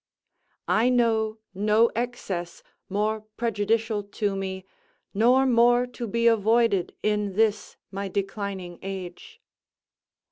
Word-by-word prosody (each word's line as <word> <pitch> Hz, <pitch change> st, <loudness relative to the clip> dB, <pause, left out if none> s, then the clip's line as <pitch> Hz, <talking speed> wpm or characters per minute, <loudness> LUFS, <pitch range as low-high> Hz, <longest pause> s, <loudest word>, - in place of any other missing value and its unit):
I 230 Hz, +3 st, +3 dB
know 225 Hz, -3 st, +1 dB, 0.2 s
no 210 Hz, +4 st, +3 dB
excess 205 Hz, -8 st, -4 dB, 0.3 s
more 215 Hz, +2 st, -1 dB, 0.2 s
prejudicial 225 Hz, -1 st, 0 dB
to 205 Hz, 0 st, -3 dB
me, 190 Hz, -1 st, -4 dB, 0.5 s
nor 245 Hz, +6 st, +4 dB
more 240 Hz, 0 st, +4 dB
to 245 Hz, -1 st, -7 dB
be 235 Hz, +2 st, -1 dB
avoided 225 Hz, -3 st, +3 dB
in 210 Hz, -2 st, 0 dB
this 215 Hz, +1 st, 0 dB, 0.2 s
my 200 Hz, 0 st, -4 dB
declining 195 Hz, -2 st, -4 dB
age. 195 Hz, -, -8 dB
215 Hz, 105 wpm, -25 LUFS, 195-235 Hz, 0.5 s, nor